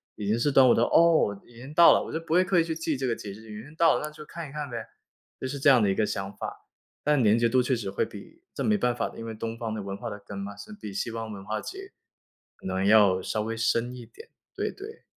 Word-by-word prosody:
已 105 -2 -5
经 110 +2 +2
是 130 +5 +1
端 135 -1 +6
午 - - +7
到 115 - +3
“哦， 160 -12 +4
已 120 - -19
经 130 +5 -10
到 170 +2 +8
了！” - - +2
我 - - -8
就 160 - -2
不 165 -1 -4
会 180 +2 +5
刻 185 -1 +2
意 - - +4
去 165 -1 -3
记 160 -2 -2
这 130 0 -2
个 115 - 0
节 105 - -8
日， 110 +3 -12
已 105 0 -8
经 145 +3 -14
到 165 0 +5
了， - - -4
那 150 - -4
就 150 0 -11
看 165 -1 -8
一 - - -12
看 150 0 -5
呗。 120 - -6 0.6
就 - - -3
是 140 - -4
这 140 +1 +5
样 130 -4 +6
的 105 - +3
一 95 - +1
个 110 - +2
想 95 -1 -4
法， - - -7 0.4
但 150 -3 +3
连 105 +1 +5
结 120 - +3
度 130 +2 +3
确 130 - 0
实 110 -5 -4
会 95 - 0
比 215 - -12
这 - - -3
没 215 -1 +3
办 125 -10 +1
法 - - -1
的， - - -14
因 115 - -7
为 115 - -5
东 115 +1 -5
方 115 -2 -4
的 110 - -4
文 100 0 -5
化 120 +1 -5
的 105 -1 -7
根 100 - -8
嘛， 100 +1 -6
是 105 - -11
比 105 - -8
西 105 - -2
方 110 -1 -5
文 100 -2 -8
化 110 +1 -2
其 385 - -7
实 390 0 -10 0.6
可 - - -17
能 95 0 -1
要 100 -3 +5
稍 105 +3 -2
微 115 +2 -3
深 115 +2 0
一 120 -2 -9
点， 450 - -15 0.3
对 - - -2
对。 420 +3 -11
120 Hz, 330 characters per minute, -27 LUFS, 105-150 Hz, 0.6 s, 到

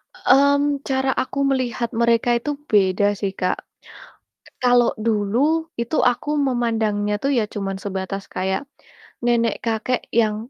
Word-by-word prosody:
Mmm, 280 +1 +3
cara 265 0 0
aku 275 +2 -4
melihat 245 -3 -1
mereka 235 0 +3
itu 295 +5 -3 0.2
beda 200 -1 +3
sih, 195 -2 -1
Kak. 185 - +1 0.9
E - - -17
kalau 245 -1 +4 0.2
dulu, 210 0 +1 0.4
itu 235 +7 -2
aku 245 - -6 0.2
memandangnya 220 -4 0
tuh 275 - +1
ya 215 - +2
cuman 195 -2 -3
sebatas 195 0 -4
kayak 190 +3 -1 0.7
nenek-kakek 235 0 0 0.2
yang 215 -2 +2
230 Hz, 125 wpm, -21 LUFS, 205-255 Hz, 0.9 s, kalau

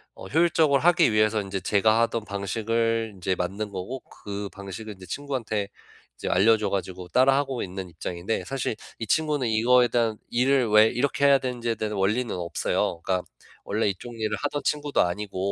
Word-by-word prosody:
어 - - -10
효율적으로 155 - +3
하기 175 -5 +4
위해서 110 0 +3
인제 95 -1 -4
제가 110 +2 +3
하던 115 -1 0
방식을 115 +3 -1
인제 95 0 -1
만든 95 +4 -3
거고 100 +8 -5 0.2
그 100 0 -4
방식을 100 +2 -7
이제 95 -1 -12
친구한테 115 -2 -3 0.5
이제 - - -6
알려줘 105 +2 +4
가지고 95 -2 -4
따라 130 +6 +4
하고 135 -3 -1
있는 95 0 -6
입장인데 85 +5 -4
사실 135 -4 -2 0.2
이 115 - -4
친구는 150 -3 +1
이거에 120 +3 +4
대한 115 -2 +1
일을 130 +1 +2
왜 105 +1 +7
이렇게 140 +4 0
해야 140 -1 +7
되는지에 120 -3 -2
대한 110 -1 -3
원리는 105 +5 0
없어요. 85 -1 -1
그러니까 90 -1 -1 0.4
원래 105 +1 0
이쪽 115 +5 -5
일을 110 -1 -1
하던 145 0 -2
친구도 150 -1 +1
아니고 95 +2 -2
110 Hz, 400 characters per minute, -25 LUFS, 100-125 Hz, 0.5 s, 왜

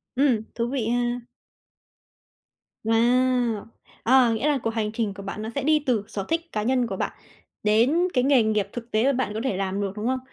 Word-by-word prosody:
Ừm, 255 -5 +3
thú 235 0 -1
vị 245 -5 -1
ha. 240 0 0 1.6
Wow! 240 0 +2 0.4
Ờ, 250 -1 +5
nghĩa 225 +6 0
là 290 -2 +3
cuộc - - +1
hành 215 -2 -1
trình 220 -3 -2
của 200 0 -9
bạn 200 +2 -5
nó 220 - -4
sẽ 280 - -1
đi 305 +1 +4
từ 230 -6 +1
sở 195 -2 -5
thích 330 +1 +1
cá 210 -1 -2
nhân 250 0 +1
của 195 - -4
bạn - - -2 0.5
đến 250 +12 +3
cái 250 -1 +2
nghề 270 -4 +4
nghiệp 210 -2 +1
thực 235 -1 -7
tế 215 +2 +2
mà 275 - +4
bạn 255 -5 -1
có 215 - -3
thể 205 -8 -1
làm 195 +1 -2
được, 195 -1 -1
đúng 215 +3 -3
không? 260 0 0
235 Hz, 215 wpm, -25 LUFS, 215-255 Hz, 1.6 s, Ờ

